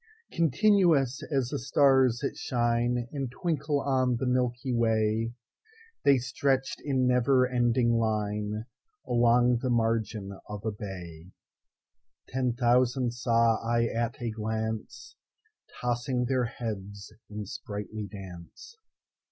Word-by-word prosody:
Continuous 165 - +3
as 135 -4 +1
the - - -3
stars 130 -2 +3
that - - -1
shineAnd 120 +2 -1
twinkle 150 +1 -1
on 130 -3 +1
the 120 - -2
Milky 125 0 0
Way, 110 0 +1 0.7
They 140 -1 +5
stretch'd 135 +1 -1
in 135 -3 +1
never 125 +1 +3
ending 120 -1 +2
lineAlong 115 - 0
the 130 - -2
margin 110 -4 -1
of 105 0 -7
a 110 - 0
bay:Ten 95 +6 -8
thousand 125 +1 +2
saw 115 -2 +2
I 115 0 +1
at 115 0 -2
a 120 -2 -2
glance, 110 0 -4 0.6
Tossing 125 +1 -1
their 130 0 +1
heads 105 -5 -6 0.2
in 105 0 -6
sprightly 105 +1 -6
dance. 95 - -11
120 Hz, 105 wpm, -28 LUFS, 110-130 Hz, 0.7 s, They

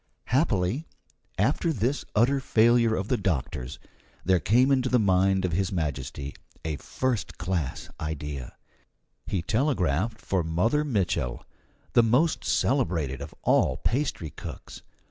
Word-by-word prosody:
Happily, 125 - +1 0.5
after 170 - +2
this 130 +1 -1
utter 125 +6 +4
failure 115 -2 +4
of 95 -1 -2
the 125 - +1
doctors, 75 - -2 0.5
there 95 0 +4
came 125 - +3
into 130 -2 +2
the 125 - +4
mind 95 -2 +3
of 90 - -1
His 95 +2 0
Majesty 70 -4 -3 0.3
a 80 -2 -2
first 125 - -2
class 90 -6 -2
idea: 75 -4 -5 0.7
he 95 -4 -1
telegraphed 110 - 0
for 95 -5 -1
Mother 100 - +1
Mitchel, 95 - -1 0.5
the - - +7
most 125 +8 +2
celebrated 80 - 0
of 70 - -8
all 65 - +3
pastry 125 - -1
cooks. - - -9
95 Hz, 125 wpm, -27 LUFS, 80-125 Hz, 0.7 s, the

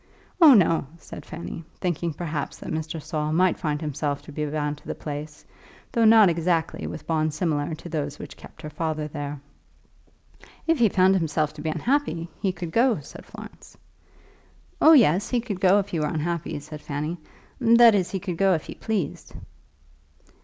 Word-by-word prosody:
"Oh, 300 -6 +9
no," 165 -7 +3
said 150 -2 -11
Fanny, 170 0 -7 0.2
thinking 170 -2 -1
perhaps 150 -2 -4
that - - -7
Mr. 160 0 -3
Saul 150 0 -3
might 180 +2 +2
find 150 -4 -1
himself 145 -1 -3
to - - -11
be 150 +1 -3
bound 150 0 -2
to - - -18
the - - -4
place, 150 0 -7 0.5
though 230 -1 +2
not 220 -2 +7
exactly 165 -1 0
with 155 - -7
bonds 155 -2 0
similar 155 -3 -1
to 165 - -11
those 145 -3 -3
which - - -9
kept - - -15
her 150 - -5
father 155 0 -2
there. 145 -1 -6 1.3
"If 330 -3 +2
he 230 -3 +5
found 185 +1 +4
himself 155 -4 0
to 150 - -10
be 160 - -2
unhappy, 230 - -1
he 195 - +1
could 175 -2 -7
go," 235 -1 +3
said 145 - -12
Florence. - - -12 1.0
"Oh, 320 - +8
yes; 200 - +4
he 245 - +1
could 210 -6 -5
go 190 +1 +5
if 200 0 -1
he 170 - -2
were 150 - 0
unhappy," 160 0 -3
said 150 +1 -10
Fanny. 150 +5 -4 0.4
"That 235 -1 +7
is, 190 -3 +1
he 195 - -3
could 180 -3 -5
go 195 -1 +4
if 155 - -4
he - - -7
pleased." 205 -9 -4
165 Hz, 180 wpm, -25 LUFS, 150-190 Hz, 1.3 s, Oh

